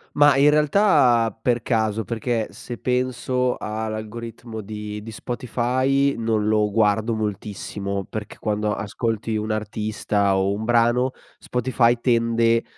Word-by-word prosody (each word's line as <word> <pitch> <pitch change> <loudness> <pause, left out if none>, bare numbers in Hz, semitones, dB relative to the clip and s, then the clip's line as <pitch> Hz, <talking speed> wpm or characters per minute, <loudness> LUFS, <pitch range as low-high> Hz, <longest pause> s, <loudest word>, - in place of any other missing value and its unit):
Ma 145 -2 +6
in 140 +2 +6
realtà 145 - +3
per 120 +1 +1
caso. 110 -2 0
Perché 115 0 -2
se 120 - -8
penso 125 0 0
a 110 +1 -4
l'algoritmo 110 +1 -6
di 105 0 -6
di 115 - -8
Spotify 130 +4 0
non 110 -2 0
lo 105 -1 +2
guardo 110 +1 +2
moltissimo, 100 -2 -4
perché 110 -1 -7
quando 105 0 -1
ascolti 110 +2 -2
un 110 0 -2
artista 105 -2 0
o 95 +1 +1
un 105 +2 -4
brano, 120 +2 +3 0.3
Spotify 125 -1 +1
tende 115 -1 +2
115 Hz, 125 wpm, -23 LUFS, 105-125 Hz, 0.3 s, Ma